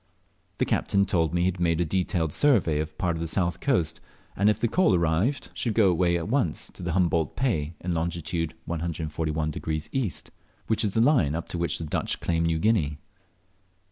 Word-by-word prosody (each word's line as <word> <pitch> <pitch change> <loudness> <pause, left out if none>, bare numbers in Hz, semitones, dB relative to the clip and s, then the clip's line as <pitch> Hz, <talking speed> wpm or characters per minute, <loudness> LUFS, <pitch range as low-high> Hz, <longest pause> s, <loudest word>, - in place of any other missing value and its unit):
The - - +1
captain 100 0 +1
told 85 -5 +1
me 85 0 0
he - - +2
had 95 0 -1
made 85 -2 +1
a 85 - +2
detailed 85 -2 -1
survey 100 - +3
of 75 0 -4
part 85 -2 0
of - - -5
the 85 - -2
south 85 0 0
coast, 100 - 0 0.3
and 100 +2 +3
if 105 - +1
the 120 - +2
coal 115 - +3
arrived 90 - 0
should 115 -3 -2
go 100 -5 +5
away 85 0 +2
at 85 - -4
once 110 - -1
to 85 -2 -4
Humboldt 85 -3 +1
Pay, 85 - -1
in 90 0 -2
longitude 85 -1 -2
141° 80 -1 -3
east, 120 - -2 0.3
which 110 - +1
is 100 -3 -1
the 115 - +4
line 115 - +3
up 85 - -4
to 85 - -3
which 85 -3 +1
the 80 - -5
Dutch 75 - -2
claim 85 -1 0
New 80 -1 +1
Guinea. 80 -6 +1
85 Hz, 195 wpm, -26 LUFS, 80-100 Hz, 0.3 s, go